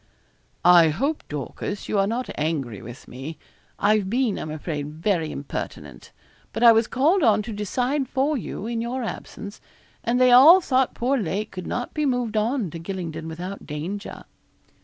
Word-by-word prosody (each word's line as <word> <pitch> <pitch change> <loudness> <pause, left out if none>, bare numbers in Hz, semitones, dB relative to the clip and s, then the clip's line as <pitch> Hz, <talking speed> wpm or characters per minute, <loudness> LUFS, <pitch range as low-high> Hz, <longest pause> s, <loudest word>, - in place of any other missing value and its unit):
'I 175 -2 +7
hope, 275 - -1
Dorcas, 150 +7 -5
you 205 - 0
are 195 - +3
not 240 +4 -2
angry 145 -9 -2
with 120 +3 -11
me. 135 +6 -8 0.4
I've 205 -2 +2
been, 240 -1 0
I'm 155 - -5
afraid, 150 -1 -4
very 165 -2 0
impertinent; 140 - -7 0.4
but 230 - -2
I 235 - +10
was 225 0 +3
called 320 +9 +2
on 220 -5 +4
to 225 - -6
decide 250 +6 -1
for 275 +3 +1
you, 215 -4 -5
in 230 0 -2
your 245 +2 -3
absence, 210 -2 -7 0.4
and 240 +1 +1
they 255 -1 +5
all 290 +9 +9
thought 265 -7 +1
poor 260 +3 +1
Lake 205 +2 -3
could 185 -2 -7
not 245 - -3
be 300 -2 0
moved 245 -4 -1
on 220 - 0
to 165 - -7
Gylingden 165 -2 -5
without 180 +5 -7
danger.' 170 +8 -5
210 Hz, 170 wpm, -24 LUFS, 165-250 Hz, 0.4 s, I